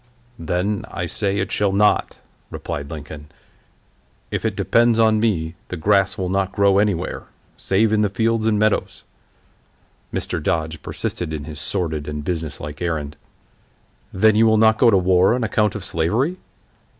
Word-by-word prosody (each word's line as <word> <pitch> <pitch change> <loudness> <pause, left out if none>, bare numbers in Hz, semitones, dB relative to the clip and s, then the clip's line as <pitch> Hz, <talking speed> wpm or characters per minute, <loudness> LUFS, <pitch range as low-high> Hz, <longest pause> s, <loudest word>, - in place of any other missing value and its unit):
"Then, 90 +5 -1
I 85 - -4
say, 100 +3 -1
it 95 -1 -2
shall 100 -1 +1
not," 105 +2 +2 0.3
replied 70 0 -6
Lincoln; 75 -1 -8 1.0
"if - - -2
it - - -1
depends 115 -1 +3
upon 110 -1 +4
me, 85 -8 0
the 90 - -5
grass 100 +4 +2
will 95 -2 -2
not 95 0 0
grow 100 -1 +3
anywhere, 100 -4 -1 0.3
save 105 +3 +1
in 105 - +3
the 105 - +2
fields 115 +2 0
and 110 -1 +2
meadows." 110 0 0 1.1
Mr. - - -3
Dodge 80 -1 -2
persisted 85 -3 -4
in 75 -2 -4
his 75 0 -8
sordid 80 -6 -2
and 75 0 -4
businesslike 75 -3 -5
errand. 75 -4 -3 1.0
"Then 110 +3 +3
you 115 +1 +5
will 110 0 +4
not 110 0 +4
go 120 - +6
to 100 - +4
war 95 +3 +3
on 125 - -2
account 105 -2 +1
of 100 -4 -6
slavery?" 115 - 0
95 Hz, 160 wpm, -21 LUFS, 80-110 Hz, 1.1 s, go